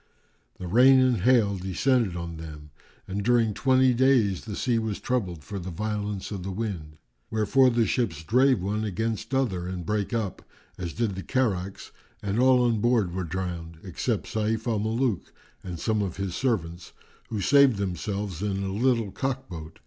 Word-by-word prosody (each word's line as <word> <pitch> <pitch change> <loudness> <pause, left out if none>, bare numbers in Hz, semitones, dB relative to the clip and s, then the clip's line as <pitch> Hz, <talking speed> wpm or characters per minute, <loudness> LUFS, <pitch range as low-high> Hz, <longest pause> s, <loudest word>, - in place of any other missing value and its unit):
The 90 - -7
rain 125 +8 +6
and 130 -2 +3
hail[FN#398] 110 -7 +3
descended 105 +1 +1
on 85 -1 -5
them 75 -2 -9 0.4
and 100 +2 -3
during 115 -2 +3
twenty 130 +2 +3
days 120 -7 +2
the 105 -2 -5
sea 120 0 +1
was 110 -2 -3
troubled 95 - -2
for 100 +8 -6
the 90 +1 -6
violence 105 +2 -3
of 100 -3 -4
the 95 - -5
wind; 90 -7 -5 0.3
wherefor 110 +5 +4
the 115 -2 +2
ships 95 -8 -1
drave 125 - +3
one 105 +3 -1
against 110 +3 -2
other 95 -10 0
and 90 -2 -5
brake 105 +2 -1
up, 110 -6 -2 0.3
as 85 -3 -5
did 115 -4 -1
the 95 - -5
carracks[FN#399] 100 -7 -2 0.3
and 100 +2 -1
all 130 -1 +5
on 115 -3 +1
board 115 -7 +2
were 95 0 -2
drowned, 85 -1 -5
except 100 +4 -2
Sayf 110 +1 -1
al 115 -3 0
Muluk 110 0 -1 0.3
and 90 -3 -6
some 110 +4 0
of 95 -3 -3
his 95 -2 -3
servants, 90 -8 -2 0.4
who 110 - -3
saved 140 +3 +5
themselves 100 -1 -3
in 100 -1 -1
a 95 0 -3
little 115 -2 +1
cock 135 +2 -3
boat. 80 -3 -8
105 Hz, 175 wpm, -26 LUFS, 90-120 Hz, 0.4 s, rain